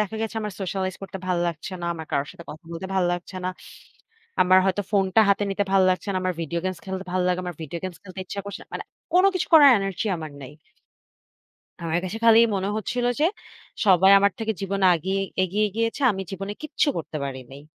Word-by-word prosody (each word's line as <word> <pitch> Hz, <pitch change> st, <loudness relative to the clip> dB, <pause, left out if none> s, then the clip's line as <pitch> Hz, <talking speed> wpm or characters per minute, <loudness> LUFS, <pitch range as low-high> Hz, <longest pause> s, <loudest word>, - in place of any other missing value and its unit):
দেখা 210 Hz, +1 st, -2 dB
গেছে 225 Hz, 0 st, -4 dB
আমার 210 Hz, -1 st, -4 dB
সোশ্যালাইজ 190 Hz, 0 st, -2 dB
করতে 195 Hz, 0 st, -6 dB
ভালো 175 Hz, -1 st, +1 dB
লাগছে 165 Hz, +3 st, -6 dB
না। -, -, -2 dB
আমার 160 Hz, -2 st, -8 dB
কারো 140 Hz, -, +1 dB
সাথে 170 Hz, -, -12 dB
কথা 155 Hz, +2 st, -11 dB
বলতে 170 Hz, +3 st, -5 dB
ভাল 190 Hz, -2 st, +2 dB
লাগছে 175 Hz, +1 st, -5 dB
না। 185 Hz, -, 0 dB, 0.9 s
আমার 185 Hz, +1 st, +6 dB
হয়তো 195 Hz, +1 st, +1 dB
ফোনটা 195 Hz, +2 st, +3 dB
হাতে 200 Hz, +1 st, +3 dB
নিতে 200 Hz, +1 st, 0 dB
ভাল 195 Hz, -1 st, +5 dB
লাগছে 185 Hz, +3 st, -2 dB
না। -, -, -1 dB
আমার 185 Hz, -1 st, -1 dB
ভিডিও 170 Hz, +2 st, -3 dB
গেমস 185 Hz, -1 st, -2 dB
খেলতে 190 Hz, 0 st, -4 dB
ভালো 185 Hz, -1 st, +1 dB
লাগে। 180 Hz, 0 st, +1 dB
আমার 175 Hz, -3 st, -5 dB
ভিডিও 165 Hz, +3 st, -5 dB
গেমস 185 Hz, -2 st, -6 dB
খেলতে 190 Hz, -1 st, -9 dB
ইচ্ছা 200 Hz, -, -5 dB
করছে 200 Hz, -, -7 dB
না। -, -, -17 dB
মানে -, -, -4 dB, 0.3 s
কোন 365 Hz, +1 st, +5 dB
কিছু 370 Hz, -, -1 dB
করার 290 Hz, -4 st, +9 dB
এনার্জি 195 Hz, +2 st, -3 dB
আমার 155 Hz, -2 st, -7 dB
নেই। 130 Hz, -, -9 dB, 1.3 s
আমার 165 Hz, 0 st, -1 dB
কাছে 190 Hz, +4 st, -4 dB
খালি 225 Hz, 0 st, +8 dB, 0.2 s
মনে 195 Hz, 0 st, -1 dB
হচ্ছিল 245 Hz, +3 st, -2 dB
যে, 305 Hz, -, +4 dB, 0.6 s
সবাই 190 Hz, 0 st, +6 dB
আমার 200 Hz, 0 st, +3 dB
থেকে 220 Hz, -1 st, -1 dB
জীবনে 195 Hz, 0 st, 0 dB
আগিয়ে 190 Hz, +4 st, -1 dB, 0.2 s
এগিয়ে 205 Hz, +3 st, +1 dB
গিয়েছে। 230 Hz, +4 st, -1 dB
আমি 195 Hz, -1 st, -4 dB
জীবনে 195 Hz, +2 st, -5 dB
কিচ্ছু 310 Hz, 0 st, 0 dB
করতে 160 Hz, -1 st, -5 dB
পারি 135 Hz, -1 st, -4 dB
নাই। 135 Hz, +1 st, -11 dB
190 Hz, 215 wpm, -24 LUFS, 175-205 Hz, 1.3 s, করার